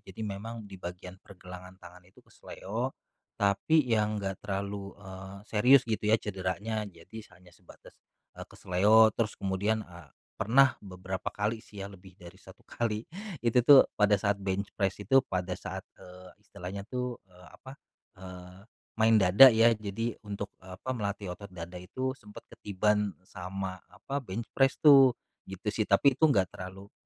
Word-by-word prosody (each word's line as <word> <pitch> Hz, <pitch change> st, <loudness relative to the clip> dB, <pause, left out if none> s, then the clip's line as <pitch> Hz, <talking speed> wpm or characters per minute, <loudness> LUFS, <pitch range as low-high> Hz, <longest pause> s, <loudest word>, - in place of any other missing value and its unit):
Jadi 95 Hz, -, -10 dB
memang 110 Hz, +3 st, -6 dB
di 95 Hz, -2 st, -12 dB
bagian 90 Hz, +1 st, -8 dB
pergelangan 90 Hz, -1 st, -12 dB
tangan 90 Hz, +1 st, -14 dB
itu -, -, -21 dB
keseleo, 115 Hz, +7 st, -6 dB, 0.5 s
tapi 125 Hz, +9 st, +2 dB
yang 105 Hz, -2 st, +1 dB
enggak 95 Hz, -1 st, -3 dB
terlalu, 100 Hz, 0 st, -4 dB
eee, 95 Hz, 0 st, -10 dB
serius 125 Hz, +5 st, +5 dB
gitu 110 Hz, -1 st, -2 dB
ya 110 Hz, +1 st, +3 dB
cederanya. 100 Hz, +2 st, -3 dB
Jadi 100 Hz, +4 st, -12 dB
hanya 90 Hz, 0 st, -20 dB
sebatas, -, -, -18 dB, 0.4 s
eee, -, -, -7 dB
keseleo. 105 Hz, +5 st, +4 dB
Terus 110 Hz, -2 st, -1 dB
kemudian, 100 Hz, +3 st, 0 dB
eee, 85 Hz, -4 st, -14 dB, 0.3 s
pernah 130 Hz, +5 st, +4 dB
beberapa 95 Hz, +1 st, -5 dB
kali 105 Hz, +2 st, -1 dB
sih 100 Hz, -, -12 dB
ya, -, -, -7 dB
lebih 95 Hz, -1 st, -15 dB
dari 90 Hz, +1 st, -12 dB
1 95 Hz, 0 st, -16 dB
kali, 110 Hz, -2 st, -3 dB, 0.4 s
itu 120 Hz, +1 st, +3 dB
tuh 140 Hz, 0 st, +8 dB
pada 105 Hz, -1 st, +4 dB
saat 100 Hz, -1 st, +1 dB
bench 100 Hz, +1 st, -2 dB
press 95 Hz, -3 st, 0 dB
itu, 120 Hz, +7 st, +4 dB
pada 90 Hz, 0 st, -3 dB
saat, -, -, -6 dB, 0.2 s
eee, 90 Hz, 0 st, -13 dB
istilahnya 95 Hz, +3 st, -8 dB
tuh, 125 Hz, -1 st, -3 dB
eee, 90 Hz, 0 st, -18 dB
apa, 130 Hz, -, -12 dB, 0.5 s
eee, 90 Hz, 0 st, -11 dB, 0.4 s
main 110 Hz, 0 st, +5 dB
dada 100 Hz, +6 st, +8 dB
ya. 115 Hz, +1 st, +5 dB
Jadi 110 Hz, +2 st, -3 dB, 0.2 s
untuk, 100 Hz, 0 st, -5 dB
eee, 95 Hz, 0 st, -11 dB
apa, 130 Hz, +7 st, -4 dB
melatih 100 Hz, -5 st, -4 dB
otot 100 Hz, +3 st, -10 dB
dada 90 Hz, 0 st, -8 dB
itu, 130 Hz, +9 st, -3 dB
sempat 105 Hz, 0 st, -13 dB
ketiban 105 Hz, +1 st, 0 dB
sama, 95 Hz, +1 st, -6 dB
apa, 140 Hz, +1 st, -5 dB
bench 115 Hz, -2 st, -5 dB
press 135 Hz, -1 st, +2 dB
tuh. 135 Hz, -5 st, +7 dB, 0.3 s
Gitu 95 Hz, +2 st, -7 dB
sih, 110 Hz, +1 st, 0 dB
tapi 120 Hz, +8 st, +5 dB
itu 160 Hz, +3 st, +4 dB
nggak 95 Hz, -10 st, +1 dB
terlalu 95 Hz, +2 st, -10 dB
100 Hz, 160 wpm, -29 LUFS, 95-110 Hz, 0.5 s, tuh